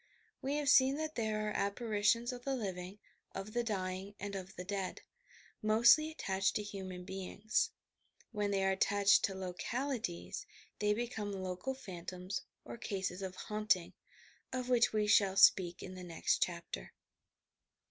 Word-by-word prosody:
We 275 +2 -1
have 295 -1 -1
seen 270 -1 +6
that 310 +1 -3
there 215 -3 -1
are - - -1
apparitions 215 +3 +1
of 245 0 -8
the 275 0 0
living, 190 -4 -4 0.4
of 195 +2 -5
the 240 - +1
dying 195 -2 -3
and 205 -1 -5
of 190 -1 -6
the 180 - -5
dead 195 -1 -3 0.3
— - - -22 0.2
mostly 235 +8 +6
attached 195 -10 0
to 210 - 0
human 190 -3 -6
beings. 195 +3 -1 0.6
When 210 -2 -1
they 195 -1 +1
are 190 - +3
attached 200 +1 +4
to 195 - -3
localities 220 - -3 0.3
they 210 0 +2
be 240 +2 -1
come 210 -4 -4
local 185 +6 -3
phantasms, 185 -3 -6 0.2
or - - -7
cases 190 -4 -3
of 190 -1 -4
"haunting," 210 -3 0 0.6
of 255 -1 -3
which 245 -2 +4
we 215 -1 +1
shall 200 -2 +4
speak 175 -2 +6
in 185 - -7
the 185 -1 -8
next 170 -2 0
chapter. 170 - -3
205 Hz, 160 wpm, -35 LUFS, 185-230 Hz, 0.6 s, seen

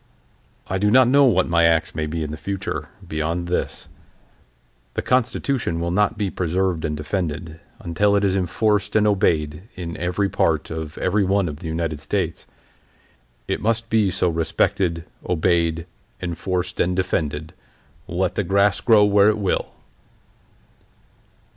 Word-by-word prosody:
"I 95 - -1
do 105 +2 +2
not 130 +2 +6
know 140 +2 +6
what 95 -8 +3
my 85 0 +3
acts 80 -1 +2
may 75 0 -2
be 80 +1 -3
in 75 - -4
the - - -4
future, 90 -4 -4 0.2
beyond 80 +2 -2
this: 90 - -2 1.1
The - - -2
Constitution 125 -6 0
will 85 0 -1
not 105 +4 +1
be 100 -3 -1
preserved 90 -1 -1
and 75 -1 -2
defended 80 0 -4 0.2
until 100 +4 +1
it 100 - +2
is 95 -1 +2
enforced 100 +2 0
and 105 -1 +4
obeyed 85 -3 +1
in 85 -2 -6
every 90 +3 0
part 85 -6 0
of 80 0 -5
every 105 0 +1
one 95 0 +1
of 75 -2 -5
the 80 - -7
United 80 -1 -2
States. - - -3 1.0
It - - -2
must 115 +1 -1
be 110 -3 +3
so 90 0 +1
respected, 85 +1 0 0.2
obeyed, 85 -1 +1 0.3
enforced, 90 +1 -3
and 90 +1 +1
defended 80 -4 -2 0.5
let - - -1
the - - -1
grass 100 0 +2
grow 110 -3 +5
where 100 0 +5
it 110 - +1
will!" 100 -3 -1
90 Hz, 150 wpm, -22 LUFS, 80-100 Hz, 1.1 s, not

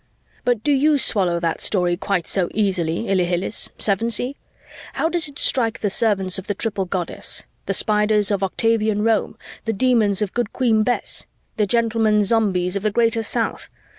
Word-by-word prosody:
But 240 -3 0
do 295 - +1
you 290 +2 +3
swallow 185 -9 +2
that 165 -1 -2
story 180 -3 +1
quite 185 -1 -2
so 185 -3 0
easily, 185 -3 0
Ilhilihis, 180 0 -1
Sevensee? 230 +6 0 0.6
How 325 - 0
does 340 -2 +2
it 285 -1 -8
strike 230 -4 +1
the 205 - 0
servants 195 -3 +1
of 190 - -10
the 205 - -2
Triple 200 -2 -2
Goddess? 180 -1 -2 0.2
The - - +1
Spiders 210 -1 +2
of 200 -1 0
Octavian 215 +1 0
Rome? 225 0 0 0.3
The 225 - -1
Demons 215 -3 +2
of 200 - -5
Good 240 -3 -2
Queen 230 -4 +2
Bess? 245 +3 -1 0.3
The 210 -2 +1
gentlemen 225 -1 +2
Zombies 195 -4 +1
of 200 - -1
the 215 - +1
Greater 230 +1 +1
South? 220 - -3
210 Hz, 165 wpm, -21 LUFS, 190-230 Hz, 0.6 s, you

